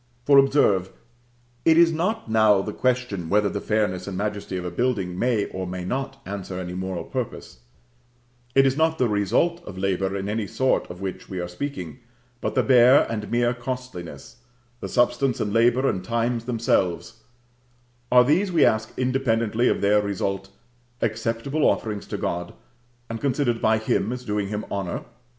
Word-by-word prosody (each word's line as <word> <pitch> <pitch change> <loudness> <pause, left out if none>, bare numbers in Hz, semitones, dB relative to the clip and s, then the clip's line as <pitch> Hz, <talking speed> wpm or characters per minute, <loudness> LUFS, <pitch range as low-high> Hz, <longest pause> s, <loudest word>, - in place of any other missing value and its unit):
For, 140 -1 +7
observe, 120 -10 +3 0.7
it 160 0 +5
is 170 0 +6
not 180 - -1
now 110 -3 +4
the 105 - -5
question 125 -9 -1
whether 105 +1 +3
the 100 - -4
fairness 105 -4 -1
and 95 -2 -4
majesty 105 -2 -3
of 90 - -5
a 90 - -3
building 95 -4 -1
may 120 -4 +1
or 95 -1 -5
may 90 0 -5
not 135 +6 -3
answer 95 -2 -5
any 90 -1 -5
moral 95 -2 -4
purpose; - - -6 1.0
it 135 0 +6
is 135 0 +2
not 160 +1 +2
the 125 - +2
result 110 - +1
of 100 -3 -9
labor 95 0 -1
in 95 0 -4
any 105 0 -2
sort 130 +5 0
of 90 +1 -9
which 95 -1 -6
we 95 - -4
are 90 - -3
speaking, 90 - -6 0.4
but - - -2
the - - +3
bare 125 +1 +6
and 105 -2 -4
mere 120 +1 +2
costliness 125 -7 -7 0.4
the - - -6
substance 120 +1 +1
and 105 -1 -2
labor 120 +3 +3
and 95 -6 -1
time 115 +3 0
themselves: 115 -3 -1 0.9
are 125 0 +7
these, 175 +9 +2
we 165 -3 +4
ask, 110 -2 +1
independently 125 -3 +1
of - - +1
their 105 +1 +4
result, 100 -1 -3 0.5
acceptable 115 +6 -1
offerings 105 -2 0
to - - -4
God, 85 0 -3 0.5
and 115 -1 -6
considered 130 -4 0
by 110 0 +3
Him 110 +1 0
as 125 0 -6
doing 105 -1 -1
Him 105 +1 -4
honor? 95 -3 -3
110 Hz, 170 wpm, -24 LUFS, 95-125 Hz, 1.0 s, For